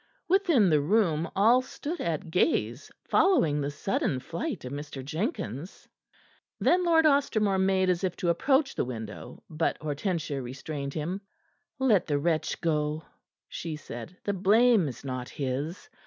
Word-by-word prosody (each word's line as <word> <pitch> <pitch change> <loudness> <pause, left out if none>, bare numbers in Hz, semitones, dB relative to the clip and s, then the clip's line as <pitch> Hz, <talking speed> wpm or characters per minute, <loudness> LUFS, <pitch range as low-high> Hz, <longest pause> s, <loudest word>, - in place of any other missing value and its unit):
Within 335 - +4
the 150 -1 +4
room 165 -2 +1
all 230 +6 +5
stood 290 +6 -6
at 165 +1 -3
gaze, 120 -7 0
following 165 - +3
the 140 - -1
sudden 145 -3 -1
flight 170 - -5
of 125 - -6
Mr. 145 -2 -6
Jenkins. 160 - -4 0.7
Then 360 +1 +3
Lord 325 -2 +4
Ostermore 220 -9 +3
made 190 0 +2
as 180 0 +1
if 185 -2 -1
to 175 - -1
approach 270 - +2
the - - -1
winnow, 110 -4 -7
but 160 +1 -1
Hortensia 155 -1 -2
restrained 140 +3 -6
him. 170 +6 -3 0.6
"Let 245 -8 +3
the 145 -2 +1
wretch 160 +2 0
go," 155 -1 0 0.4
she 165 -2 -5
said. 150 +3 -9
"The 205 - -1
blame 210 0 +4
is 135 +1 -8
not 130 -2 -4
his. 140 +6 -4
170 Hz, 145 wpm, -28 LUFS, 145-215 Hz, 0.7 s, all